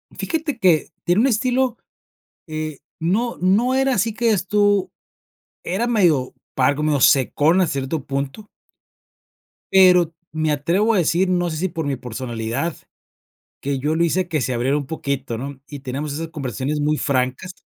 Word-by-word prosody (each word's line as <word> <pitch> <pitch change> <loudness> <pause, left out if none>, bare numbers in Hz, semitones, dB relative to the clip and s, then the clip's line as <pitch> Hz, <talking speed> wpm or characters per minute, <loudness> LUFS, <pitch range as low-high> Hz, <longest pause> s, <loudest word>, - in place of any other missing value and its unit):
Fíjate 315 -5 -2
que 175 -6 +3
tiene 175 +5 +3
un 260 - +4
estilo 255 +1 +1 0.7
eh, 155 -2 -5 0.2
no 210 +9 0
no 210 +8 +3
era 270 0 +2
así 220 +2 +1
que 235 +2 -1
digas 205 -5 +2
tú, 205 -1 +2 0.7
era 195 +7 -1
medio 175 - +2 0.2
pagno, 145 +2 +1
secón 145 +7 +4
a 185 - +3
cierto 135 0 -3
punto. 140 +9 -4 1.3
Pero 180 -3 +6 0.2
me 155 0 0
atrevo 175 +10 +1
a - - +2
decir, 180 +2 +2
no 175 -1 +1
sé 155 - -4
si 185 +4 0
por 160 -1 -4
mi 140 -2 -1
personalidad 120 +4 -4 0.8
que 140 0 -2
yo 150 +4 0
lo 170 - +2
hice 180 +2 +1
que 155 -4 -1
se 125 - -1
abriera 125 +4 +1
un 140 -2 -4
poquito, 140 -6 -3
¿no?, 135 +2 -7
y 145 - -8
teníamos 140 +2 -4
esas 160 +2 -4
conversaciones 140 0 -3
muy 150 +1 +1
francas. 130 +6 -1
160 Hz, 160 wpm, -21 LUFS, 140-190 Hz, 1.3 s, Pero